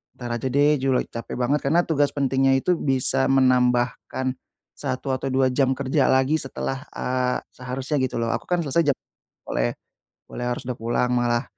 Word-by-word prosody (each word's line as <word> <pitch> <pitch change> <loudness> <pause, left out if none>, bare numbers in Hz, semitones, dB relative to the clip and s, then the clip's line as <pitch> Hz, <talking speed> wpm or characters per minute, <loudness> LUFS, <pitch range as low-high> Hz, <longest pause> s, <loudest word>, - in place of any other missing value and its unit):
"Entar 120 -1 -4
aja, 130 - -2
deh. 145 +2 +4
Ju 135 0 +1
lagi - - 0
capek 115 - -6
banget," 140 +4 +2
karena 165 +5 +3
tugas 145 -3 +2
pentingnya 135 -1 +2
itu 180 +5 +1
bisa 135 -2 +2
menambahkan 125 0 +2 0.4
1 130 +1 -3
atau 135 - -4
2 130 0 +3
jam 130 0 +2
kerja 135 0 +1
lagi, 130 +4 +3
setelah, 135 0 -4
eee, 125 0 -1 0.2
seharusnya, 130 +3 -4
gitu 125 -2 -2
lo. 115 - 0
Aku - - -5
kan 180 -1 +1
selesai 145 +1 +2
jam - - -3 0.5
boleh - - -1 0.5
boleh 120 - -5
harus 120 - -3
udah 125 - -2
pulang, 120 +2 0
malah. 120 0 +1
130 Hz, 175 wpm, -24 LUFS, 125-140 Hz, 0.5 s, deh